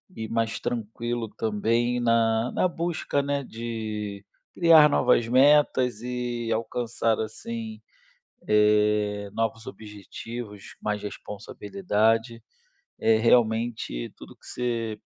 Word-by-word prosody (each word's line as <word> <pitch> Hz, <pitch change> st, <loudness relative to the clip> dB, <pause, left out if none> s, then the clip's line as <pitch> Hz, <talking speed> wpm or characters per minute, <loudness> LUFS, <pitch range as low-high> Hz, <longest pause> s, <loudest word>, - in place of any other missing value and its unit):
e 110 Hz, 0 st, -5 dB
mais 115 Hz, -1 st, -1 dB
tranquilo 120 Hz, 0 st, -3 dB
também 115 Hz, +3 st, 0 dB
na 115 Hz, 0 st, +2 dB
na -, -, +1 dB
busca, 165 Hz, -4 st, -1 dB
né, 140 Hz, 0 st, -1 dB
de 110 Hz, -4 st, -5 dB, 0.3 s
criar 165 Hz, -3 st, +7 dB
novas 120 Hz, -4 st, +3 dB
metas 130 Hz, -3 st, +4 dB
e 120 Hz, -1 st, -3 dB
alcançar, 115 Hz, 0 st, -1 dB
assim, 110 Hz, 0 st, -6 dB, 0.7 s
eh, 105 Hz, -1 st, +2 dB
novos 115 Hz, 0 st, -2 dB
objetivos, 105 Hz, +1 st, -9 dB
mais 105 Hz, -1 st, -2 dB
responsabilidade. 110 Hz, -, -1 dB, 0.6 s
É, 115 Hz, -, +4 dB
realmente, 110 Hz, -, +1 dB
tudo -, -, -12 dB
o -, -, -20 dB
que -, -, -26 dB
você 115 Hz, -3 st, -3 dB
115 Hz, 105 wpm, -26 LUFS, 105-120 Hz, 0.7 s, criar